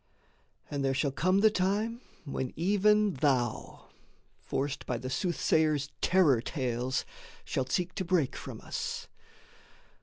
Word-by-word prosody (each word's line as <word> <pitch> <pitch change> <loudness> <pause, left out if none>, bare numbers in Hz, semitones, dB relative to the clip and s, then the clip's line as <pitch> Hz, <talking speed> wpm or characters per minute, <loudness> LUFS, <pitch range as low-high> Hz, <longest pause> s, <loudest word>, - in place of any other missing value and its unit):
And 140 -1 -2
there 135 0 +1
shall 140 +1 +1
come 185 +7 +2
the 220 0 +6
time 210 +5 0 0.2
when 130 -3 -3
even 205 +3 +3
thou, 130 -5 -1 0.5
Forced 140 0 -3
by 125 - -1
the 130 +2 -5
soothsayer's 155 -4 +1
terror 160 -10 +4
tales, 125 -2 -2 0.4
shalt 130 0 -2
seek 180 0 0
To - - -2
break 170 -6 +1
from - - -8
us. - - -4
155 Hz, 125 wpm, -30 LUFS, 130-190 Hz, 0.5 s, the